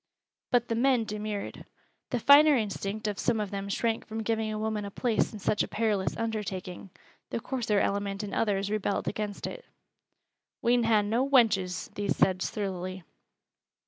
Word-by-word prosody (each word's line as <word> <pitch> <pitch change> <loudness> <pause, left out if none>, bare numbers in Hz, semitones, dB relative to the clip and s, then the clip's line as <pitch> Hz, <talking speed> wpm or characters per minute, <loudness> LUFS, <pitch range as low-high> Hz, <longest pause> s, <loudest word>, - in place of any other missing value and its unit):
But 245 -1 +2
the - - -1
men 245 0 +3
demurred. 210 -1 -5 0.5
The 245 - -1
finer 290 +4 +7
instinct 215 0 -3
of 205 -2 -3
some 235 -3 +1
of 210 -2 -3
them 200 0 -4
shrank 225 +2 -1
from 220 0 -4
giving 220 0 -1
a 215 - -3
woman 215 -1 -2
a 200 - -5
place 230 +2 0
in 215 - -7
such 210 +1 0
a - - 0
perilous 210 -4 0
undertaking 200 -5 -4 0.4
the - - -2
coarser 230 -4 0
element 200 0 -1
in 205 - -6
others 200 -2 0
rebelled 210 -1 -1
against 210 0 -3
it. - - -6 1.0
"We'n 240 0 +3
ha' 220 -2 +4
no 230 +5 +1
wenches," 210 -9 +2
these 205 -1 -1
said, 185 -1 +3
surlily. 185 -3 -3
215 Hz, 165 wpm, -29 LUFS, 200-230 Hz, 1.0 s, finer